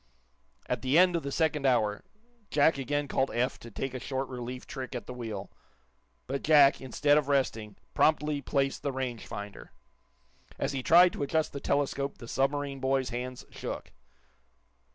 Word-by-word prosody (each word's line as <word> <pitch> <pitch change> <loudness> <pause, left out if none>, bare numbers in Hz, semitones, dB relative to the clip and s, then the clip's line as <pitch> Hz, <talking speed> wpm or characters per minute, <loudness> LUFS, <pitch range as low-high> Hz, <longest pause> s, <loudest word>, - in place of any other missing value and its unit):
At - - -2
the 130 +4 +2
end 180 0 +6
of 170 - 0
the 140 - -5
second 155 -1 +1
hour, 105 -5 +1 0.5
Jack 145 0 +3
again 145 +2 -1
called 135 0 +1
Eph 125 +3 -1
to 115 - -10
take 130 +4 -4
a 130 - -4
short 135 +2 -3
relief 125 0 -6
trick 130 -1 -6
at 120 -4 -5
the 125 - -7
wheel. 110 -5 -6 0.7
But 135 +1 -3
Jack, 145 -3 +6
instead 145 +3 +3
of 145 - -4
resting, 115 -7 0 0.2
promptly 150 -2 +2
placed 135 0 0
the 140 - -1
range 130 -3 -4
finder. 105 0 -8 0.8
As 135 - -1
he 135 -2 -2
tried 175 +6 +6
to - - -6
adjust 155 +2 0
the 140 - -4
telescope 140 0 -1
the 120 - -10
submarine 140 +2 -1
boy's 130 0 0
hands 125 +1 -5
shook. - - -6
135 Hz, 170 wpm, -29 LUFS, 125-145 Hz, 0.8 s, end